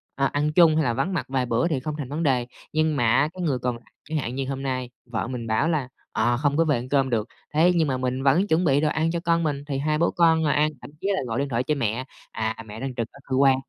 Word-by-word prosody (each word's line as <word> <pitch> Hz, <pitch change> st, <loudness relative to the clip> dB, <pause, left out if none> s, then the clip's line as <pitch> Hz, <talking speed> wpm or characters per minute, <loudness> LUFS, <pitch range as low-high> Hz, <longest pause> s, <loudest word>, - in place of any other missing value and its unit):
à, 140 Hz, -, +1 dB
ăn 145 Hz, +2 st, 0 dB
chung 165 Hz, -2 st, +6 dB
hay 155 Hz, -7 st, +2 dB
vắng 135 Hz, +10 st, -1 dB
mặt 170 Hz, -, -1 dB
vài 130 Hz, -1 st, 0 dB
bữa 120 Hz, +4 st, +1 dB
thì 155 Hz, -6 st, 0 dB
không 150 Hz, +3 st, -4 dB
thành 140 Hz, -5 st, -5 dB
vấn 155 Hz, +4 st, -2 dB
đề. 125 Hz, -5 st, +1 dB, 0.3 s
Nhưng 155 Hz, 0 st, +2 dB
mà 125 Hz, -, +1 dB
á, 145 Hz, +3 st, +4 dB
cái 185 Hz, -, -7 dB
người 140 Hz, -6 st, 0 dB
còn 125 Hz, 0 st, -1 dB
lại 115 Hz, -, -14 dB, 0.2 s
chẳng 160 Hz, -, -1 dB
hạn 125 Hz, -4 st, -3 dB
như 135 Hz, 0 st, -2 dB
hôm 135 Hz, 0 st, -4 dB
nay 130 Hz, -2 st, -2 dB, 0.2 s
vợ 120 Hz, -2 st, -3 dB
mình 120 Hz, -2 st, -5 dB
bảo 110 Hz, +7 st, +1 dB
là 150 Hz, -6 st, 0 dB, 0.2 s
"Ờ, 120 Hz, +2 st, +1 dB
không 145 Hz, +2 st, +1 dB
có 165 Hz, -, +4 dB
về 125 Hz, -5 st, 0 dB
cơm 135 Hz, -2 st, +3 dB
được." 115 Hz, -2 st, 0 dB, 0.3 s
Thế 165 Hz, +4 st, +5 dB
nhưng 160 Hz, -2 st, +3 dB
mà 130 Hz, -2 st, 0 dB
mình 130 Hz, +1 st, -2 dB
vẫn 155 Hz, +9 st, +3 dB
chuẩn 170 Hz, 0 st, +2 dB
bị 140 Hz, -2 st, +3 dB
đồ 155 Hz, -, +2 dB
ăn 160 Hz, +2 st, 0 dB
cho 170 Hz, -, -1 dB
con 170 Hz, -1 st, +1 dB
mình, 145 Hz, -3 st, -1 dB
thì 140 Hz, -2 st, -2 dB
hai 150 Hz, +2 st, 0 dB
bố 170 Hz, +2 st, +2 dB
con 165 Hz, -2 st, +4 dB
ngồi 150 Hz, -3 st, +2 dB
ăn 150 Hz, +1 st, +3 dB
thậm -, -, -10 dB
chí -, -, -2 dB
là -, -, -1 dB
gọi 115 Hz, +1 st, -2 dB
điện 140 Hz, 0 st, -1 dB
thoại 120 Hz, 0 st, 0 dB
cho 150 Hz, +3 st, 0 dB
mẹ, 120 Hz, -1 st, -1 dB, 0.3 s
"à, 110 Hz, 0 st, -2 dB
mẹ 105 Hz, +1 st, -9 dB
đang 130 Hz, 0 st, -4 dB
trực 115 Hz, -2 st, -2 dB
ở 140 Hz, -, -16 dB
cơ 130 Hz, -, -2 dB
quan 135 Hz, 0 st, +5 dB
140 Hz, 300 wpm, -24 LUFS, 125-155 Hz, 0.3 s, chung